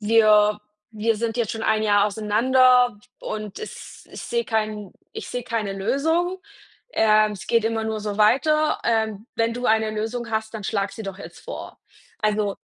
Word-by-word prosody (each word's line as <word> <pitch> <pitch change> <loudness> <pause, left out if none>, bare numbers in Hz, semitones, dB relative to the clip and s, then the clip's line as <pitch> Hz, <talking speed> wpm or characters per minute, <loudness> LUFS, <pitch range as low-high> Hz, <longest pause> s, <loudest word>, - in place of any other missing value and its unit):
wir 210 -1 +4 0.4
wir 220 +1 +1
sind 230 +1 -2
jetzt 230 -4 0
schon 225 0 -5
1 220 0 +2
Jahr 205 -1 +4
auseinander 245 +3 +3 0.2
und 215 -2 -6
es 440 - -10
ich - - -8
sehe 470 0 -1
keinen 215 -3 -2 0.2
ich - - -7
sehe 245 0 -4
keine 220 -5 -2
Lösung. 320 - 0 0.6
Ähm, 215 -1 +4
es 205 +2 -10
geht 230 -2 +2
immer 225 0 -1
nur 220 -1 -2
so 210 0 -4
weiter. 305 +8 +3
Ähm, 220 -2 0
wenn 230 0 +1
du 245 +1 -4
eine 220 0 +2
Lösung 225 +2 -4
hast, 220 0 -2
dann 215 - -6
schlag 200 0 -1
sie 220 - -8
doch 195 -1 -6
jetzt - - -11
vor.“ - - -8 0.4
Also, 210 -2 0
220 Hz, 175 wpm, -23 LUFS, 210-235 Hz, 0.6 s, wir